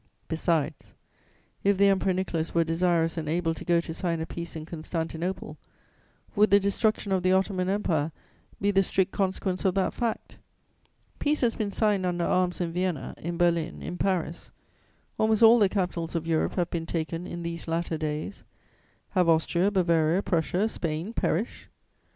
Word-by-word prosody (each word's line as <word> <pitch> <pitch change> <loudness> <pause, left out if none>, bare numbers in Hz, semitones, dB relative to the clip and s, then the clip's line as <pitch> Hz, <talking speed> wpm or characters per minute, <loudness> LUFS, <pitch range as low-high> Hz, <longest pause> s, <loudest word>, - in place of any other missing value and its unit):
"Besides, 160 -2 -1 0.7
if 200 -1 +3
the 200 - +5
Emperor 195 -1 +3
Nicholas 175 -3 -2
were 170 - +4
desirous 165 0 +1
and 155 -2 -3
able 165 0 0
to - - -8
go 170 -1 +3
to 165 - -6
sign 170 -1 -2
a 160 - -2
peace 170 0 -7
in 155 -1 -6
Constantinople, 165 0 -4 0.8
would 210 +1 +5
the 200 - +6
destruction 200 +1 0
of 190 -1 +2
the 185 +1 +3
Ottoman 190 -1 +1
Empire 165 -6 0 0.5
be 200 +1 +2
the 195 -1 +4
strict 190 0 0
consequence 190 -1 -1
of 190 -1 +2
that 195 - +1
fact? 235 -2 -3 0.8
Peace 295 +1 +1
has 235 -3 +3
been 210 -2 -2
signed 205 -2 +1
under 175 -1 0
arms 180 -1 +1
in 170 -2 -2
Vienna, 180 -4 -2
in 170 +1 -4
Berlin, 170 -2 +1
in 175 - -5
Paris; 175 -4 -1 0.7
almost 220 0 +3
all 230 +2 +8
the 200 -3 +4
capitals 180 -4 -2
of 165 -1 -1
Europe 165 -1 0
have 175 -2 0
been 165 -1 -3
taken 165 +1 -3
in 170 0 -6
these 170 0 -5
latter 165 -1 -1
days: 155 +5 -4 0.7
have 180 -4 +2
Austria, 170 +3 +3
Bavaria, 170 -2 +2
Prussia, 180 +4 +1
Spain 170 0 -3
perished? 210 0 -1
175 Hz, 170 wpm, -27 LUFS, 165-195 Hz, 0.8 s, all